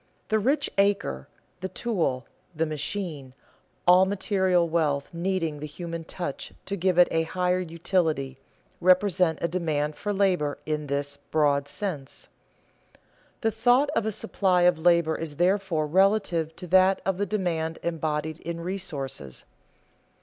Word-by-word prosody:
The 220 - +2
rich 275 +6 +1
acre, 195 - +1 0.3
the 190 - -4
tool, 170 - -1 0.3
the 160 +1 +1
machine, 155 -3 -4 0.5
all 180 +1 +7
material 190 -3 +1
wealth 155 -3 0
needing 170 -3 -1
the 150 - -5
human 165 +1 -6
touch 170 -4 -5
to 200 - -3
give 185 -1 0
it 180 - +7
a 165 - +2
higher 180 +2 0
utility, 160 -6 -1 0.4
represent 180 -2 +3
a - - +3
demand 155 -4 -1
for 205 - -3
labor 185 -8 +1
in 150 -1 -2
this 140 0 -1
broad 145 -1 +1
sense. 145 -5 -5 1.1
The 225 - +1
thought 245 +6 +3
of 230 -5 0
a - - 0
supply 190 -4 +1
of 175 -2 +4
labor 170 -1 +3
is 160 -3 -5
therefore 180 -2 +1
relative 175 -2 +2
to 180 - -8
that 185 +2 +4
of 195 -1 0
the 205 - 0
demand 165 -5 -1
embodied 155 -1 -2
in 170 0 -5
resources. 155 - -5
170 Hz, 140 wpm, -26 LUFS, 155-190 Hz, 1.1 s, all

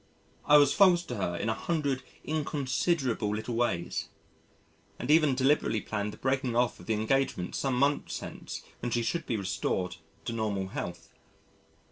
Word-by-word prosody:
I 150 - +8
was 145 -1 +5
false 180 -4 +5
to 125 -8 -5
her 85 -3 -1
in 110 - -2
a 110 - +2
hundred 140 +1 -1 0.2
inconsiderable 140 -6 0
little 110 +3 -4
ways 115 -8 -1 0.9
and 130 - -1
even 155 -4 +5
deliberately 135 -4 +2
planned 105 0 -3
the - - -11
breaking 130 -2 0
off 120 0 +1
of - - -13
the 110 - +2
engagement 110 -4 0
some 135 -3 0
months 140 +2 +1
hence - - -7 0.2
when 120 - -2
she 120 0 0
should 170 +8 -2
be 115 - 0
restored 95 -2 -2 0.3
to 115 - -2
normal 105 -4 -1
health. 85 -2 -6
125 Hz, 160 wpm, -29 LUFS, 105-140 Hz, 0.9 s, I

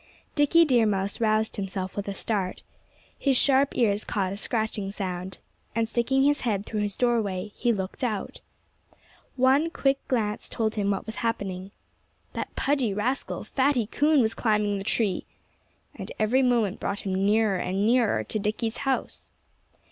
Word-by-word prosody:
Dickie 320 +3 +5
Deer 240 -6 +4
Mouse 200 +1 -1
roused 220 0 +1
himself 190 -1 -4
with 205 0 -4
a 200 - -3
start. 195 -3 -2 0.6
His 275 -3 +3
sharp 275 +1 +3
ears 210 -3 +2
caught 190 -2 -1
a - - -6
scratching 215 -2 -1
sound. 185 -2 -5 0.4
And 230 -1 +1
sticking 260 +4 +1
his 290 +1 +3
head 210 -4 -1
through 215 - -3
his 205 -2 -2
doorway, 210 -6 0
he 240 - +1
looked 195 +2 -4
out. 215 -5 -3 0.9
One 270 +5 +3
quick 275 -4 +1
glance 215 -5 -1
told 220 -1 -1
him 200 -2 0
what 195 -1 -1
was 220 0 -7
happening. 195 -5 -3 0.6
That - - -5
pudgy 265 -8 +1
rascal, 250 +6 -2
Fatty 265 -4 +1
Coon, 295 +6 +3
was 220 -1 +1
climbing 210 -3 +1
the - - -5
tree! 205 -2 0 0.7
And - - -8
every 230 +5 +3
moment 235 -6 +2
brought 200 - -3
him 195 - -3
nearer 210 -1 +3
and 195 +3 -1
nearer 235 -1 +3
to 215 - -3
Dickie's 220 +2 -2
house. 270 -1 -2
220 Hz, 160 wpm, -26 LUFS, 200-250 Hz, 0.9 s, Dickie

